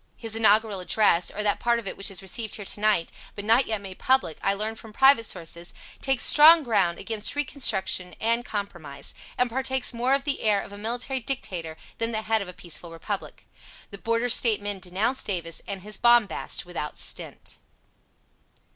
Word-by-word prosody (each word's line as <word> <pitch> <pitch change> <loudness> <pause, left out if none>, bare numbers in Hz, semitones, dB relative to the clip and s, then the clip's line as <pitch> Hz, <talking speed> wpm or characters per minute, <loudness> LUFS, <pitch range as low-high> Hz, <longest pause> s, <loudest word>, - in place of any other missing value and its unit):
His 225 -2 -4
inaugural 215 -2 +3
address, 180 -2 +3
or 210 - -3
that 205 -1 +1
part 235 0 +2
of 230 -4 -6
it - - -3
which 195 +1 -2
is 195 0 -4
received 215 +3 -3
here 205 - -7
to 205 - 0
night, 210 -6 +2 0.2
but 205 - -6
not 230 +5 +4
yet 220 -2 -1
made 190 -2 -9
public, 260 -12 +2
I 195 - +2
learn 215 +2 -2
from 225 0 -12
private 265 0 +5
sources, 170 +1 -6 0.3
takes 270 -2 +1
strong 315 +2 +7
ground 195 -8 +1
against 220 +2 -3
reconstruction 250 -10 -1
and 230 +2 +1
compromise, 175 -11 -6 0.2
and 250 - +2
partakes 260 +1 -1
more 245 +3 +2
of 275 - -2
the 285 -1 -2
air 210 -2 +3
of 200 - -8
a - - -9
military 245 +4 -1
dictator 185 -11 -3 0.2
than 230 0 -1
the 220 0 -2
head 220 0 +1
of 200 - -6
a - - -7
peaceful 170 -1 -6
Republic. 180 +5 -6 0.5
The 200 - -9
Border 230 +3 0
State 230 -2 +4
men 205 -1 -3
denounce 195 +9 -1
Davis 170 -4 -3
and 195 -2 -5
his 210 -1 -4
bombast 235 -7 +3
without 170 -4 -5
stint. - - -2
215 Hz, 190 wpm, -25 LUFS, 190-235 Hz, 0.5 s, strong